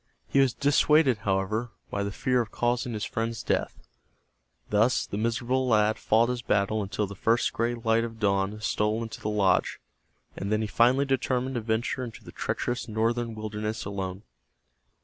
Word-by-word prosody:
He 140 - +2
was 135 -3 +3
dissuaded, 145 -3 +4
however, 105 +3 -1 0.2
by 100 - -1
the 100 0 -2
fear 125 +4 +1
of 115 - -5
causing 120 +1 -1
his 105 - -3
friend's 115 -1 -3
death. - - -1 0.9
Thus 110 +4 +3
the - - -6
miserable 120 +4 0
lad 110 -2 +3
fought 115 +2 +3
his 125 -1 -2
battle 105 -1 +1
until 105 +1 -2
the 100 - -8
first 115 +4 +1
gray 120 +1 0
light 115 -1 +1
of 115 -1 -6
dawn 100 0 +1
stole 110 +1 0
into 115 - -8
the 105 - -2
lodge, 100 -3 +2 0.6
and 100 - -4
then 110 0 +2
he 110 - -1
finally 125 +6 +3
determined 130 -1 0
to 120 - -2
venture 115 +4 -1
into 120 -2 -8
the - - -11
treacherous 120 0 -3
northern 115 +1 -1
wilderness 110 0 -4
alone. 95 -1 -4
110 Hz, 170 wpm, -27 LUFS, 105-120 Hz, 0.9 s, dissuaded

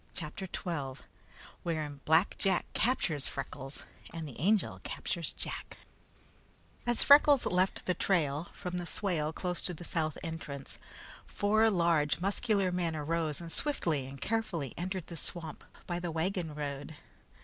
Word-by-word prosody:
CHAPTER 170 +4 -5
XII 145 -8 -4 0.6
Wherein 155 -4 -2
Black 160 +5 +4
Jack 190 -3 +2
Captures 165 - +2
Freckles 135 0 -6 0.3
and 165 -2 -5
the 130 - -9
Angel 200 +6 +2
Captures - - -2
Jack - - -5 1.1
As 240 -1 +4
Freckles 285 -1 +8
left 185 +2 +1
the 180 - +2
trail, 160 -4 +1
from 180 0 -4
the 175 - -4
swale 165 -7 0
close 180 +1 -1
the 175 -1 -3
south 155 -3 -1
entrance, 160 -4 -6 0.5
four 215 +2 +3
large 170 -6 +3
muscular 195 0 +1
men 175 -3 0
arose 155 0 -1
and 170 -1 -7
swiftly 165 - +1
and 135 +1 -9
carefully 175 - -1
entered 185 0 -3
the 170 - -7
swamp 160 -1 -3 0.2
by 175 -1 -2
the 175 -1 -3
wagon 165 -1 -1
road. 145 +1 -4
170 Hz, 140 wpm, -32 LUFS, 150-185 Hz, 1.1 s, Freckles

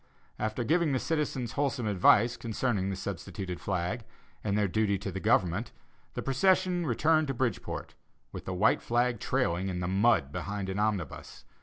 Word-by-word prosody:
After 110 +3 -1
giving 160 +2 +2
the - - +2
citizens 145 -6 -1
wholesome 135 -5 -1
advice 105 +4 +4
concerning 110 -4 -1
the 95 - -2
substituted 95 -1 -5
flag, 95 +8 -2 0.4
and 100 -1 0
their 105 -1 +2
duty 100 +1 +1
to 100 +1 -5
the 95 - -4
government, 90 +4 +1 0.4
the - - -3
procession 180 +4 +2
returned 155 0 +3
to 135 - -2
Bridgeport, 120 -5 -3 0.4
with - - -8
the - - -3
white - - +3
flag 120 -1 +1
trailing 95 -8 0
in 90 -1 -3
the 90 - -2
mud 95 - +3
behind 100 +3 -4
an 95 +2 -2
omnibus.... 105 -8 -3
110 Hz, 165 wpm, -30 LUFS, 95-130 Hz, 0.4 s, advice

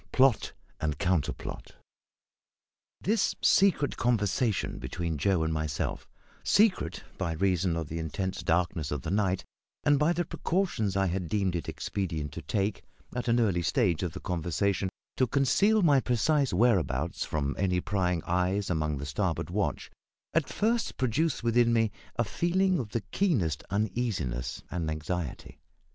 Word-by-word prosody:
PLOT 130 -3 +3 0.3
AND 75 -2 -1
COUNTERPLOT. 85 -4 -2 1.3
This 215 +3 +1
secret 190 -7 +3
conversation 115 -2 0
between 85 -4 -3
Joe 90 +1 +2
and 80 0 0
myself 75 -1 -3 0.3
secret 195 - +2 0.2
by 85 -4 -1
reason 90 0 +1
of 80 -2 -3
the 80 +3 -4
intense 95 +4 -3
darkness 80 -3 0
of 75 -4 -3
the 80 - -3
night, 95 -2 +1 0.4
and 145 -1 +4
by 150 +3 +3
the 175 0 0
precautions 155 - -1
I 95 - +3
had 90 -2 -2
deemed 95 -4 0
it 85 - -3
expedient 80 -7 -3
to - - -7
take, 100 -1 -1 0.3
at 125 - -3
an 120 0 +3
early 100 -7 +2
stage 85 - +1
of 90 -4 -2
the - - -6
conversation, 90 +3 -1 0.3
to 130 - +3
conceal 195 - +3
my 145 -5 +5
precise 130 +3 +2
whereabouts 90 - +1
from 70 -2 -2
any 90 -2 +2
prying 90 -3 0
eyes 90 +3 0
among 75 -3 0
the 70 - -5
starboard 70 -1 -2
watch - - -2 0.4
at 165 -3 +1
first 230 +2 0
produced 130 +3 0
within 120 0 +3
me 115 -2 +2 0.2
a 120 - +2
feeling 180 - +1
of 115 -5 -4
the 115 +2 -2
keenest 95 - +1
uneasiness 100 - -2
and 85 -3 -2
anxiety. 80 -1 -4
95 Hz, 150 wpm, -29 LUFS, 80-125 Hz, 1.3 s, my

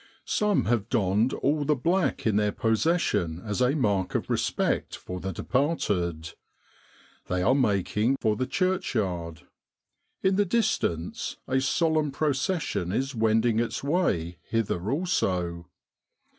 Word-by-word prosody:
Some 210 -2 +1
have 115 -3 0
donned 110 0 +2
all 145 +2 0
the 150 +1 +2
black 175 +8 0
in 110 -3 +2
their 105 0 +2
possession 110 - +1
as 105 +3 -2
a 125 +3 +3
mark 100 -9 0
of - - -1
respect - - 0
for 90 0 -7
the 95 +1 -4
departed. 90 - -1 0.9
They 90 0 0
are 130 - +4
making 110 0 +1
for 110 -2 +1
the 130 +2 -2
church 185 -4 0
yard. 85 -6 -2 0.8
In 190 0 +3
the 205 - +3
distance 170 - -1
a 130 0 +1
solemn 155 +2 +1
procession 140 - -1
is 135 +6 -1
wending 110 0 +2
its 120 +3 -2
way 90 - 0
hither 105 -4 -1
also. 90 - -1
115 Hz, 130 wpm, -27 LUFS, 95-150 Hz, 0.9 s, are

